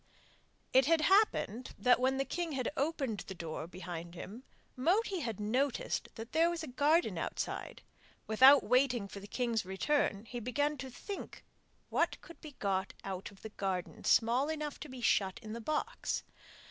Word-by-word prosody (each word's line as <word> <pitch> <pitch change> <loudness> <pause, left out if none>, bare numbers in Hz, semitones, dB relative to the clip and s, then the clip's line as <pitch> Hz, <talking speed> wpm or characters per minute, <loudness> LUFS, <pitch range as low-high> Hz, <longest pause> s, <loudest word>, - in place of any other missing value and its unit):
It 260 0 +6
happened 325 - +3
that 250 0 +4
when 260 +1 +2
the 270 - 0
king 345 -1 -3
had 255 -3 -1
opened 275 -7 -1
the 190 - -7
door 160 -2 -5
behind 175 -1 -7
him, 205 +7 -8 0.3
Moti 360 - +1
noticed 245 +6 -1
that 225 +2 -8
there 330 +2 +4
was 345 -1 -3
a - - -5
garden 290 +6 +2
outside: - - -4 0.4
without 260 +6 +7
waiting 250 -3 +2
for 200 - -8
the 200 - -10
king's 235 -2 0
return 200 +2 0
he 240 +2 -5
began 290 +6 0
to 265 0 -5
think 395 - -7 0.5
what - - +1
could 335 - -14
be 305 -3 -9
got 195 -1 -1
out 190 -1 -5
of 200 - -18
the 220 - -6
garden 190 -4 -3
small 245 +5 +3
enough 300 -2 -3
to 300 - -8
be 255 -1 -8
shut 190 -5 +2
in 215 0 -6
the 235 - -5
box. 310 - -2
250 Hz, 165 wpm, -33 LUFS, 205-295 Hz, 0.5 s, without